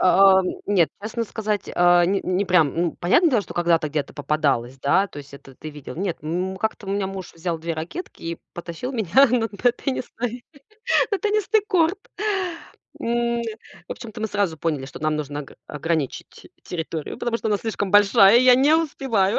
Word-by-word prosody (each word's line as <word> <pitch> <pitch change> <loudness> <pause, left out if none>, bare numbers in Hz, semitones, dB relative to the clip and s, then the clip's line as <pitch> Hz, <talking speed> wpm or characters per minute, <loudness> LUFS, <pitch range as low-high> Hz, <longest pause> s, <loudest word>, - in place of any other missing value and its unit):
А, 190 +1 +6
ам. 185 - -3 0.2
Нет, 185 -6 +3
честно 225 +2 -3
сказать, 210 -2 -3
а, 175 0 +5
не 195 +2 +1
не 185 +2 0
прям. 175 -6 +3
Ну, 170 0 0
понятне 310 - +3
дело, 225 -5 +2
что - - -11
когда-то 170 -2 +2
где-то 150 -1 -3
попадалось, 140 -4 -1
да, 190 +8 +3
то 145 - -10
есть, 140 -1 -11
это 135 -1 -14
ты 155 +3 -8
видел. 145 -2 -9
Нет, 185 -2 -2
м, 180 +4 -2
у - - -10
как-то 220 -1 -3
у - - -3
меня 200 -1 0
муж 190 -2 -7
взял 165 0 -3
2 165 0 -3
ракетки 165 - -7
и 165 0 -4 0.2
потащил 175 +10 -6
меня 225 +4 +4
на 250 - +2
на 235 +4 +1
теннисный, 245 -2 -4 0.7
на 400 - +2
теннисный 425 +2 +1
корт. 360 -1 +2 1.0
М, - - -3 0.3
н 235 - -4 0.4
в - - -3
общем-то, 220 -2 -9
мы 220 - 0
сразу 195 -6 -1
поняли, 150 -5 -2
что - - -10
нам 155 0 0
нужна 145 0 -4
г - - -15
ограничить 150 -2 -4
территорию, 160 -3 -5
потому 240 -1 -1
что 220 - -3
она 205 -1 +1
слишком 205 -3 -3
большая, 205 +1 +6
и 250 - +4
я 250 -1 +8
не 280 +5 +4
успеваю. 265 -11 +1
190 Hz, 195 wpm, -23 LUFS, 160-230 Hz, 1.0 s, я